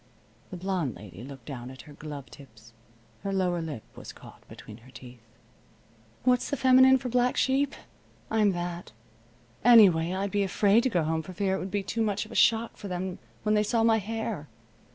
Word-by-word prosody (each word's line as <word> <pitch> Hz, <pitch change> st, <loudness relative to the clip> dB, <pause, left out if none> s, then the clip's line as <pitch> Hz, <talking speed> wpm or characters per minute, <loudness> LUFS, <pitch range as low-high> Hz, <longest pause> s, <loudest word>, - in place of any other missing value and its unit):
The 185 Hz, -, -7 dB
blonde 180 Hz, -, -2 dB
lady 100 Hz, -1 st, -11 dB
looked 135 Hz, -2 st, -11 dB
down 125 Hz, -3 st, -7 dB
at 130 Hz, 0 st, -11 dB
her 150 Hz, -, -14 dB
glove 145 Hz, -2 st, -9 dB
tips. 115 Hz, -4 st, -16 dB, 0.5 s
Her 195 Hz, -, -3 dB
lower 180 Hz, -3 st, 0 dB
lip 150 Hz, -9 st, -6 dB
was -, -, -9 dB
caught -, -, -15 dB
between 105 Hz, -, -12 dB
her 120 Hz, +2 st, -18 dB
teeth. 125 Hz, -2 st, -13 dB, 1.0 s
"What's 250 Hz, 0 st, +2 dB
the 285 Hz, -, -2 dB
feminine 260 Hz, +1 st, +6 dB
for 260 Hz, -, -6 dB
black 250 Hz, +1 st, +1 dB
sheep? 275 Hz, +1 st, +1 dB, 0.6 s
I'm 215 Hz, -2 st, +3 dB
that. 175 Hz, -4 st, -5 dB, 0.7 s
Anyway, 195 Hz, -8 st, +6 dB
I'd 190 Hz, +1 st, -2 dB
be 205 Hz, 0 st, +1 dB
afraid 200 Hz, +3 st, +3 dB
to 260 Hz, -, 0 dB
go 175 Hz, -8 st, +1 dB
home 160 Hz, +1 st, -1 dB
for 185 Hz, +4 st, -10 dB
fear 190 Hz, +1 st, 0 dB
it -, -, -3 dB
would 190 Hz, -, -5 dB
be 200 Hz, +1 st, -2 dB
too 230 Hz, +4 st, -3 dB
much 210 Hz, -1 st, -1 dB
of -, -, -15 dB
a -, -, -8 dB
shock 230 Hz, -1 st, +2 dB
for 205 Hz, -, -8 dB
them 180 Hz, 0 st, -4 dB, 0.2 s
when 215 Hz, -, +1 dB
they 210 Hz, -, +3 dB
saw 225 Hz, +2 st, +1 dB
my 225 Hz, -1 st, +4 dB
hair. 220 Hz, -6 st, -4 dB
190 Hz, 195 wpm, -27 LUFS, 155-225 Hz, 1.0 s, feminine